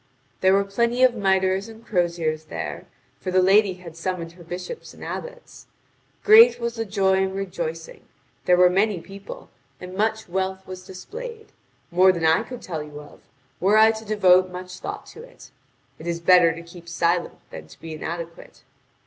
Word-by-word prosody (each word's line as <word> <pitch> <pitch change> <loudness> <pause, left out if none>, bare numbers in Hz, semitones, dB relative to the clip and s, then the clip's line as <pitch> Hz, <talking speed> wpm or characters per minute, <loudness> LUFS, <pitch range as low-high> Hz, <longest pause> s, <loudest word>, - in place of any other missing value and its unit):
There 190 0 +4
were 200 +1 +3
plenty 235 +5 0
of 255 -1 +6
mitres 190 -1 +1
and 225 +1 -14
croziers 170 -4 -1
there, - - -6 0.3
for 185 - -5
the 185 0 +3
lady 195 0 +4
had 175 -3 -12
summoned 170 -1 -4
her 170 0 -15
bishops 180 - -8
and - - -12
abbots. - - -8 0.6
Great 450 - +8
was 235 0 -2
the 225 -1 -4
joy 190 -2 +2
and 190 0 -1
rejoicing, 170 -4 -5 0.4
there 180 - +4
were 180 0 +7
many 195 +1 +1
people, 195 +3 -11 0.3
and 180 0 -9
much 220 +2 -1
wealth 190 +1 -3
was 185 0 -9
displayed 445 - -9 0.4
more 185 +2 +6
than 170 -3 -2
I 160 0 +4
could 250 -2 -9
tell 160 -4 -4
you 150 -1 -9
of, 145 0 -14 0.4
were 200 +4 +3
I 220 +1 +7
to 220 0 -7
devote 185 -4 +4
much 180 0 -8
thought - - -6
to 455 - -11
it. - - -15 0.5
It 160 - -9
is 170 0 -2
better 175 -1 +6
to 165 +1 -8
keep 170 0 -13
silent 170 +1 0
than 80 0 -9
to 80 - -17
be 165 -1 -8
inadequate. 165 +2 -7
185 Hz, 180 wpm, -23 LUFS, 170-215 Hz, 0.6 s, Great